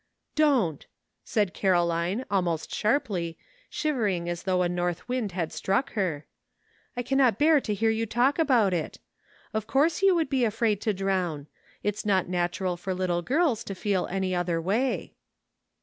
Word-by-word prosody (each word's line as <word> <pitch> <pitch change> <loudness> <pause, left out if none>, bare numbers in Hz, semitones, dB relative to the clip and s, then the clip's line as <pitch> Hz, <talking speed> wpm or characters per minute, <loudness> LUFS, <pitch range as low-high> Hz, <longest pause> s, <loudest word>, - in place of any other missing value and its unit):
" - - -51
Don't," 220 - +1 0.4
said 205 -4 0
Caroline, 175 +4 +1
almost 175 -5 -1
sharply, 210 - 0 0.3
shiv 305 -1 -1
ering 190 -8 0
as 175 0 -3
though 185 -1 +1
a - - +2
north 175 0 -2
wind 245 -6 -2
had 170 -3 -3
struck 250 +9 -1
her, 175 -8 -1 0.3
" - - -37
I 245 - -1
cannot 260 -4 +3
bear 300 +1 +5
to 215 - -2
hear 225 +2 +2
you 225 +1 -1
talk 250 +7 +2
about 240 - +3
it. 165 -3 -3 0.6
Of 215 -1 -2
course 310 +6 +2
you 390 -2 +5
would 325 -2 +1
be 265 -2 +2
afraid 220 -2 +1
to 215 - 0
drown. 185 -6 -1 0.4
It's 210 0 -2
not 190 -3 +2
natural 180 0 -1
for 185 +2 -3
little 180 -2 0
girls 265 - +1
to 195 - -5
feel 195 -1 0
any 190 0 -1
other 175 -2 0
way." 215 +10 -1
195 Hz, 170 wpm, -27 LUFS, 175-245 Hz, 0.6 s, bear